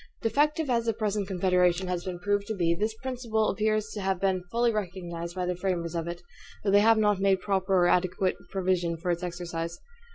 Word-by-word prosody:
Defective 295 +7 +2
as 235 -2 +1
the 225 - +1
present 210 -2 -1
Confederation 180 -1 +2
has 180 -1 -2
been 185 -2 -4
proved 205 +2 -1
to 220 - -2
be, 170 -3 +2
this 215 +5 -1
principle 235 -4 0
appears 215 0 0
to 210 - -5
have 190 -1 0
been 190 -2 +1
fully 235 +3 +2
recognized 175 -4 -4
by 180 -1 -1
the 180 0 -1
framers 175 -2 -2
of 165 -1 -2
it; 175 0 -6 0.4
though 200 - +1
they 200 - +7
have 225 +2 +5
not 210 -2 +3
made 195 -1 +3
proper 190 -1 0
or 175 -1 +5
adequate 185 +1 +1
provision 180 -3 0
for 175 +2 -1
its 170 +1 -2
exercise. 170 -1 -4
190 Hz, 205 wpm, -28 LUFS, 175-215 Hz, 0.4 s, they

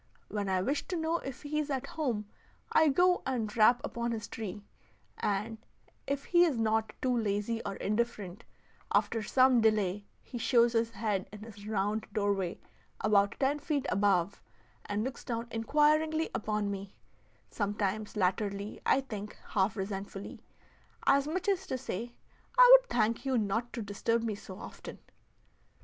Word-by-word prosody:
When 205 -2 -2
I 185 -1 +1
wish 280 +6 -1
to 365 - -2
know 325 0 0
if 270 +1 -8
he 300 +1 -1
is 300 -1 -2
at 265 -3 -2
home, 245 -10 -2 0.5
I 315 - +5
go 360 +5 +3
and 230 -5 -2
rap 235 +2 +6
upon 235 0 -2
his 215 -2 -5
tree, 205 -2 -6 0.6
and, 210 +2 -1 0.5
if 280 0 -1
he 350 -1 +5
is 315 -8 +2
not 220 -1 +1
too 255 -1 +2
lazy 220 0 -1
or 200 - -3
indifferent, 210 -3 -2 0.5
after 225 - +2
some 255 +2 +4
delay 210 -2 +1 0.2
he 240 - -7
shows 235 0 +4
his 230 0 +2
head 215 -4 -2
in 210 0 -10
his 205 -2 -11
round 210 +1 -1
doorway 200 -4 0 0.4
about 200 -1 +3
ten 280 +2 +1
feet 285 -2 -1
above, 200 -2 +1 0.5
and 205 +1 -1
looks 260 +2 -5
down 230 -1 -3
inquiringly 305 +7 +2
upon 210 -1 -1
me 195 0 -7 0.6
sometimes 205 0 -2
latterly 200 +2 -1
I 270 - +3
think 210 -5 -7
half 195 +1 +1
resentfully, 195 0 -5 0.6
as 280 +1 +4
much 365 +5 -2
as 385 -1 +1
to 260 - -2
say, 235 +1 -5 0.4
"I - - +10
would - - -20
thank 225 0 +1
you 265 -2 +1
not 225 +3 -1
to 235 - -4
disturb 225 +3 -1
me 225 -2 -1
so 190 -2 -9
often." - - -9
225 Hz, 160 wpm, -31 LUFS, 205-260 Hz, 0.6 s, I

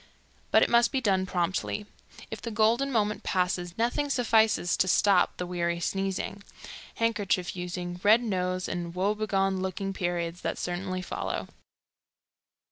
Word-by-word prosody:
But - - +5
it - - +2
must 235 0 +5
be 265 - +1
done 190 -6 +1
promptly. 185 +4 -1 0.5
If - - -6
the 235 - -4
golden 230 +5 +2
moment 210 -3 0
passes, 180 -1 -1
nothing 245 +5 0
suffices 220 -8 +3
to 185 - +2
stop 190 +1 +3
the 180 - -3
weary 170 -1 -1
sneezing, 195 +2 -2 0.5
handkerchief 205 -6 0
using, 180 0 -5
red 220 +4 +5
nose 185 -4 -1
and 170 0 -4
woe 195 +3 +1
begone 195 -3 0
looking 190 +1 -3
periods 175 -1 -2
that - - -2
certainly 185 +1 -3
follow. - - -4
190 Hz, 140 wpm, -28 LUFS, 180-215 Hz, 0.5 s, But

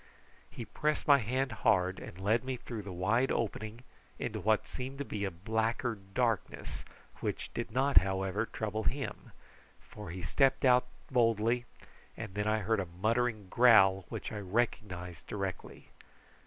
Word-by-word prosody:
He 120 - -7
pressed 150 +8 -1
my 140 -1 +7
hand 130 +3 -1
hard 95 -2 +3
and 90 - -9
led 110 +5 +2
me 130 -1 -3
through 115 -2 -6
the 100 -1 -8
wide 105 +9 +1
opening 110 +1 -3 0.3
into - - -3
what 110 0 +2
seemed 130 +2 -6
to 140 - -4
be 105 -4 -3
a - - 0
blacker 110 +6 -1
darkness, 105 +1 -2 0.4
which - - -3
did 120 - -3
not, 135 +4 +1
however, 95 +3 -1
trouble 110 0 -3
him, 140 0 -3 0.5
for 105 -3 -10
he 90 +1 -6
stepped 135 -1 +2
out 125 0 +5 0.2
boldly, 115 0 +2 0.5
and 110 -4 -6
then 105 +1 -1
I 110 0 +2
heard 110 +2 +1
a 95 - -2
muttering 110 +4 0
growl 95 -6 +6
which - - -5
I 105 - -4
recognised 95 -5 -2
directly. 95 -3 -5
110 Hz, 155 wpm, -32 LUFS, 95-120 Hz, 0.5 s, my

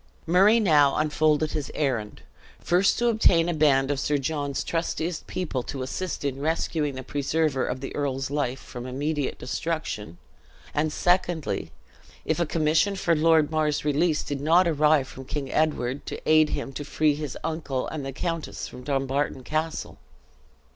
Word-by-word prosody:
Murray 195 +7 +5
now 150 -9 +4
unfolded 155 0 +2
his 150 -3 -3
errand 125 -8 -2 0.4
first 180 +3 +2
to 240 - +1
obtain 180 -7 +4
a 175 - 0
band 145 -3 +3
of 140 - -1
Sir 145 +1 +1
John's 145 0 -2
trustiest 165 0 -2
people 165 -8 -2
to 130 +1 -5
assist 165 +4 -4
in 135 -1 -2
rescuing 155 -2 -1
the 130 - -6
preserver 145 0 0
of 125 0 -3
the 135 - -6
earl's 135 -2 -2
life 135 -3 -1
from 125 0 -8
immediate 145 +2 -2
destruction; 130 - -4 0.6
and 155 +1 0
secondly, 175 -1 0 0.5
if - - 0
a 170 - +1
commission 160 +5 +2
for 170 -3 +1
Lord 160 -1 +4
Mar's 155 -2 0
release 150 +2 +2
did 140 -1 -4
not 170 +4 +4
arrive 150 -3 +3
from 135 - -10
King 140 0 -4
Edward, 145 -4 0
to - - -5
aid 155 0 +5
him 135 - -4
to 145 - -5
free 150 +1 +2
his 150 -2 -5
uncle 155 -5 -2
and 155 -3 -5
the 135 - -4
countess 165 +4 -4
from 125 - -10
Dumbarton 135 0 -1
Castle. 155 +3 -3
150 Hz, 160 wpm, -26 LUFS, 135-160 Hz, 0.6 s, Murray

